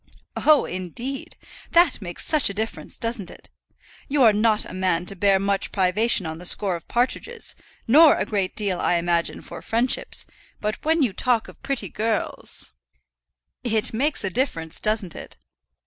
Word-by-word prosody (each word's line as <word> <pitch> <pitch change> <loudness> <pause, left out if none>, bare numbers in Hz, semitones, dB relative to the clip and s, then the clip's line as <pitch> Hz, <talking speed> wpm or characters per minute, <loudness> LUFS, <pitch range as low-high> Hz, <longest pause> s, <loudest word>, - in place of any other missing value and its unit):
"Oh, 305 -1 +4
indeed. 210 +10 -6 0.4
That 340 -8 +4
makes 175 -3 -3
such 305 -8 +5
a 200 - -6
difference; 220 +2 -3
doesn't 230 -5 -2
it? - - -15 0.6
You 280 -1 +2
are 220 -3 +6
not 215 0 +1
a - - -10
man 180 -2 -1
to 195 - -1
bear 195 +1 +3
much 195 0 -1
privation 195 +1 +2
on 160 0 -6
the 180 - -9
score 195 -2 +4
of 170 - -10
partridges, 435 - 0 0.3
nor 300 +6 +7
a - - -1
great 195 -3 -2
deal, 195 -4 0
I 175 - +1
imagine, 170 0 -1
for - - -10
friendship. 235 +3 0 0.4
But 210 0 -4
when 320 0 +2
you 230 -7 0
talk 240 +1 0
of - - -15
pretty 275 -1 -4
girls 220 0 -1 0.5
" - - -60
"It 215 - 0
makes 290 +7 0
a 195 - -2
difference, 165 - -1
doesn't 215 -5 0
it?" - - -11
215 Hz, 170 wpm, -23 LUFS, 185-255 Hz, 0.6 s, nor